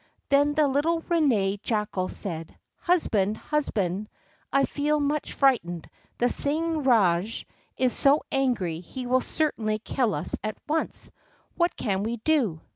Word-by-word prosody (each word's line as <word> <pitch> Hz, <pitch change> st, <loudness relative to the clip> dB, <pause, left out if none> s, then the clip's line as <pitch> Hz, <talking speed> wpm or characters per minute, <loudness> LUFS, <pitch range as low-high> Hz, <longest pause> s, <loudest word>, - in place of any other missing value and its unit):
Then 285 Hz, +1 st, +3 dB
the 305 Hz, -1 st, +4 dB
little 310 Hz, +5 st, +1 dB
Ranee 235 Hz, -, +1 dB
Jackal 210 Hz, -5 st, -1 dB
said: 165 Hz, -4 st, -6 dB, 0.2 s
"Husband, 220 Hz, -, +1 dB
husband, 210 Hz, -, -1 dB, 0.4 s
I 275 Hz, 0 st, +3 dB
feel 300 Hz, +1 st, 0 dB
much 295 Hz, +1 st, -1 dB
frightened. 195 Hz, -, +1 dB, 0.3 s
The 245 Hz, -, +2 dB
Singh 315 Hz, +4 st, +1 dB
Rajah 210 Hz, -4 st, +2 dB, 0.3 s
is 255 Hz, -2 st, +2 dB
so 285 Hz, +2 st, +4 dB
angry 230 Hz, -12 st, 0 dB
he 250 Hz, +9 st, -7 dB
will 255 Hz, +1 st, +2 dB
certainly 225 Hz, -10 st, -1 dB
kill 230 Hz, -, -1 dB
us 145 Hz, -, -3 dB
at 215 Hz, 0 st, -3 dB
once. 315 Hz, +1 st, -2 dB, 0.4 s
What 345 Hz, 0 st, +1 dB
can 195 Hz, -3 st, -1 dB
we 230 Hz, +3 st, -2 dB
do?" 225 Hz, -, +1 dB
250 Hz, 135 wpm, -26 LUFS, 200-295 Hz, 0.4 s, the